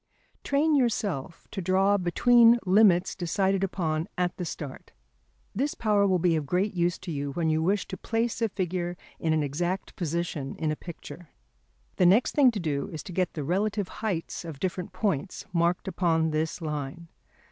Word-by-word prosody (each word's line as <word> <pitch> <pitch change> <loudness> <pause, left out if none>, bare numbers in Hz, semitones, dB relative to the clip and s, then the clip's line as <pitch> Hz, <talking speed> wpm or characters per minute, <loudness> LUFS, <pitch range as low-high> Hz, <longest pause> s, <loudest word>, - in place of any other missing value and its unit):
Train 295 +2 +2
yourself 205 - -1
to 195 - -4
draw 190 +3 +3
between 230 +6 +5
limits 185 -2 +4
decided 190 +2 0
upon 165 -4 -1
at 180 -1 0
the 180 - -3
start. 145 -4 -7 0.6
This 280 +7 -1
power 205 -3 +2
will 185 -1 +3
be 175 -1 +2
of 150 -3 -2
great 185 +6 0
use 175 -1 +1
to 185 -2 -7
you 140 -2 -3
when 160 0 0
you 155 0 +1
wish 195 +4 +1
to 190 - -6
place 225 +4 -1
a 225 - +2
figure 180 -2 -3 0.2
in 160 - 0
an 155 -1 +2
exact 175 +7 -3
position 165 -4 -3
in 155 -1 -1
a - - -1
picture. 170 0 -10 0.7
The 180 - +5
next 205 +7 +4
thing 280 -3 +6
to 225 -4 -3
do 145 -5 -2
is 155 - -6
to 200 - -9
get 180 0 -1
the 150 - -3
relative 200 +5 -1
heights 190 -8 -3
of 160 -5 -8
different 180 +1 -3
points 190 -4 -2
marked 170 +1 +1
upon 165 -4 +1
this 160 +2 -2
line. 150 +2 -4
180 Hz, 180 wpm, -27 LUFS, 160-200 Hz, 0.7 s, thing